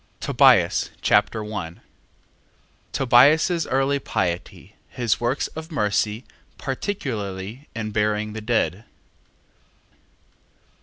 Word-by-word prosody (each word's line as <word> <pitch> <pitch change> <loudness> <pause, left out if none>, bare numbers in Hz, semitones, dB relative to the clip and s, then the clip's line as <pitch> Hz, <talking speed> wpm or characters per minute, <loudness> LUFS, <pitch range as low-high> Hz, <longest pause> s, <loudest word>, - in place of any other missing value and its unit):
Tobias - - +4
Chapter 105 +1 +2
1 100 -6 -6 1.1
Tobias's 150 +7 +4
early 135 +2 +1
piety: 90 -8 -4
his 115 -4 -1
works 120 +4 0
of 160 +2 -9
mercy, 105 -3 0 0.3
particularly 120 - -5
in 110 -1 -4
burying 105 0 0
the 110 - -6
dead. 110 -3 -1
110 Hz, 85 wpm, -23 LUFS, 105-135 Hz, 1.1 s, Tobias